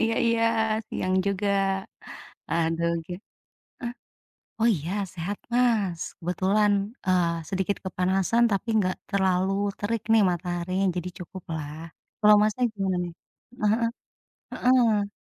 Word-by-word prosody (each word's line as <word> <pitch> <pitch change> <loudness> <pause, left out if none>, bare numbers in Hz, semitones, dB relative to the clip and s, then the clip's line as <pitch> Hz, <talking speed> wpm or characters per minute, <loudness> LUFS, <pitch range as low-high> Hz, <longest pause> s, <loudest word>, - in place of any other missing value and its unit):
iya 225 0 +2
iya, 230 0 +2 0.5
siang 185 0 -1
juga. 200 +1 0 1.0
Aduh, 165 0 +1 0.2
gi - - -6 0.7
eh, 240 0 -3 0.7
oh, 230 - +4
iya, 160 +5 -5 0.2
sehat 185 +4 -4
Mas. 220 -9 +2 0.2
Kebetulan, 190 +4 +2 0.3
eee, 170 -3 +1
sedikit 190 +1 -1
kepanasan 190 +5 +1
tapi 200 +4 -1
nggak 185 -2 +1
terlalu 190 -1 +2 0.3
terik 220 +1 -1
nih 225 -1 +6
mataharinya, 175 +2 -2
jadi 180 0 -2
cukuplah. 165 -5 -6 0.5
Kalau 210 -1 +7
Masnya 215 +4 +1
gimana 195 -2 -1
nih? 175 - -6 0.5
Heeh 210 - +4
heeh. 230 - +2 0.6
Heeh. 230 -5 +3
190 Hz, 120 wpm, -26 LUFS, 180-215 Hz, 1.0 s, Kalau